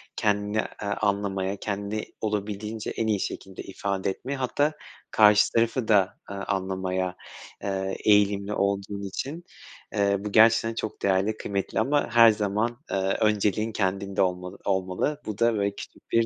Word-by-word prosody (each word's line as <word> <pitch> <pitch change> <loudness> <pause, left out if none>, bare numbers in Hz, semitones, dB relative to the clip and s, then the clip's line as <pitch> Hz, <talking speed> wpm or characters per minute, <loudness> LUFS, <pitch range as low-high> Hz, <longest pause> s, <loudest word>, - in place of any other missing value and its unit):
kendini, 105 0 0 0.3
ııı, 100 0 -1
anlamaya, 100 -1 0
kendini 100 +1 -3 0.2
olabildiğince 105 +1 -3
en 115 - -2
iyi 105 -2 +1
şekilde 95 0 -5
ifade 95 0 -2
etmeye, 135 +8 -4
hatta 145 +4 0 0.4
karşı 105 -1 +6
tarafı 115 +1 +1
da, 100 -3 +3
ııı, 100 0 -5
anlamaya, 95 -1 -2 0.5
ııı, 95 -1 -2
eğilimli 105 -1 +3
olduğun 100 0 -1
için, 145 - -5 0.5
ııı, 100 0 +1
bu 105 - -3
gerçekten 115 +1 +5
çok 110 -1 -5
değerli, 100 +3 +1
kıymetli 100 +1 -2
ama 145 +5 +1
her 115 -1 +8
zaman, 110 +3 -1
ııı, 95 0 0
önceliğin 105 0 +2
kendinde 100 -1 -1
olma 90 -1 0
olmalı. 95 +10 -1
Bu 105 -1 -4
da, 115 0 +3
böyle 100 -1 0
küçük - - -12
bir 115 0 +4
100 Hz, 145 wpm, -26 LUFS, 95-110 Hz, 0.5 s, her